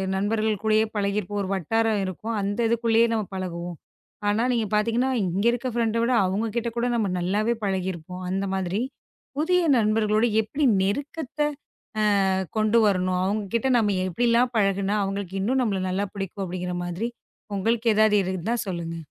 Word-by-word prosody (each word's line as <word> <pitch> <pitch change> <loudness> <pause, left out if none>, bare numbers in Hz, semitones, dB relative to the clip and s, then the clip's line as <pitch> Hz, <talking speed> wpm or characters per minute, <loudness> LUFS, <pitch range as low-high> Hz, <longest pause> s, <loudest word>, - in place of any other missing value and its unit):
நண்பர்கள் 215 +1 0
கூடயே 215 0 +4
பழகி 200 0 0
இருப்போம். 205 +1 -3
ஒரு 185 - -4
வட்டாரம் 220 +3 +1
இருக்கும். 215 +5 -4
அந்த 200 +3 -2
இதுக்குள்ளயே 230 0 +3
நம்ம 220 -2 0
பழகவோம். 175 -2 -5 0.5
ஆனா, 210 +3 +2
நீங்கப் 225 -4 -1
பாத்தீங்கன்னா, 230 +5 +1
இங்க 185 +4 -1
இருக்க 245 +1 -2
ஃபிரெண்டு 230 -1 +1 0.3
அவங்க 200 +5 0
கிட்ட 235 0 0
கூட 235 - +1
நம்ம 220 -3 +1
நல்லாவே 210 +6 +1
பழகி 190 -2 0
இருப்போம். 180 +2 -8
அந்த 195 +2 -1
மாதிரி. 190 +2 -1 0.6
புதிய 360 +4 +2 0.2
நண்பர்களோட 215 0 +2 0.2
எப்படி 275 +7 -1 0.2
நெருக்கத்தை, 285 +7 -1 0.8
ஆ, - - +2 0.3
கொண்டு 215 +1 +3
வரணும். 185 -2 +1
அவங்க 205 +3 0
கிட்ட 235 +3 +2
நம்ம 205 -4 +1
எப்படி 185 +7 0
எல்லாம் 240 +2 +3
பழகுனா, 200 0 +1
அவங்களுக்கு 195 -1 -4
இன்னும் 255 +6 +1
நம்மள 200 -5 0
நல்லா 190 +2 -1
பிடிக்கும் 195 0 -4
அப்படிங்கற 180 0 -4
மாதிரி, 175 +6 -3 0.5
உங்களுக்கு 225 +4 +1
ஏதாவது 215 -1 +5
இருந்தா 185 +4 -2
சொல்லுங்க. 170 -3 -4
210 Hz, 155 wpm, -25 LUFS, 190-230 Hz, 0.8 s, ஏதாவது